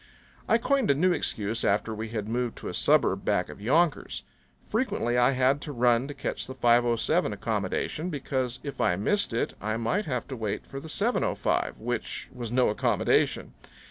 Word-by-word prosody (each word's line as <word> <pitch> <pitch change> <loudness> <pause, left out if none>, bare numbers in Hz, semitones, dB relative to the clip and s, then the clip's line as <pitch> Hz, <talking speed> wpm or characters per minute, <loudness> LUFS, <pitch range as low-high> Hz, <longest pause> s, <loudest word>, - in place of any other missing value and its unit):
I 230 - +5
coined 270 +1 +1
a 140 - +5
new 180 +6 +3
excuse 110 -7 -2
after 105 +3 +1
we 110 +1 -5
had 110 -2 -4
moved 120 +1 -2
to - - -7
a - - -5
suburb - - +3
back - - +1
of - - -10
Yonkers. 155 +8 +1 0.4
Frequently 220 - -1
I 125 +2 +4
had 130 +2 +2
to 150 - -5
run 120 0 +2
to 145 - -7
catch 135 - -4
the 130 - -7
5:07 120 -1 +3
accommodation, 165 +4 -2
because 130 -5 -2
if 140 - -5
I 90 - +3
missed 200 - +1
it 115 - -1
I 110 +1 -1
might 115 - 0
have 125 -5 -3
to 135 - -4
wait 110 -4 -3
for 135 - -7
the 160 - -10
7:05, 220 +9 0
which 120 +1 -4
was 120 -3 -5
no 125 +1 +3
accommodation. 105 - +1
125 Hz, 180 wpm, -27 LUFS, 115-145 Hz, 0.4 s, I